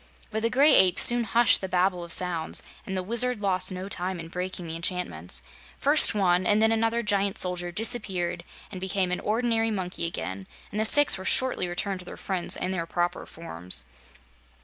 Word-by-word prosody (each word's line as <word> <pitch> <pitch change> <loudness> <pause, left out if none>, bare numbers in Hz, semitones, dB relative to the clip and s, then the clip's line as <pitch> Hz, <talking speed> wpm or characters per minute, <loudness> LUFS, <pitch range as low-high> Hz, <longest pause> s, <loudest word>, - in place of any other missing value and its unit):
But 220 0 -3
the 230 - 0
Gray 280 +5 +4
Ape 185 -2 +5
soon 240 -1 +5
hushed 230 +4 +4
the 190 - -5
babel 180 -1 0
of 170 - -8
sounds, 170 -3 +1 0.2
and 190 -1 -4
the 185 - -2
Wizard 235 +3 +1
lost 185 -2 +1
no 185 +1 -6
time 185 -2 -4
in 165 0 -9
breaking 180 0 -5
the 165 0 -6
enchantments. 90 - -4 0.3
First 290 -4 +4
one 185 -3 +2
and 210 0 +3
then 220 +1 +3
another 225 +1 0
giant 200 -2 -1
soldier 180 -1 -1
disappeared 190 -5 -2 0.3
and 185 -2 -8
became 190 -1 -1
an 180 - -1
ordinary 225 +1 0
monkey 185 -5 -3
again, 95 - -6 0.2
and 210 - -4
the 220 - +1
six 285 -5 +3
were - - -7
shortly 255 -7 +1
returned 185 +2 -3
to 180 - -11
their - - -9
friends 185 -3 +1
in 185 - -3
their 170 -3 -3
proper 175 +1 -3
forms. 90 - +1
185 Hz, 195 wpm, -26 LUFS, 175-220 Hz, 0.3 s, Ape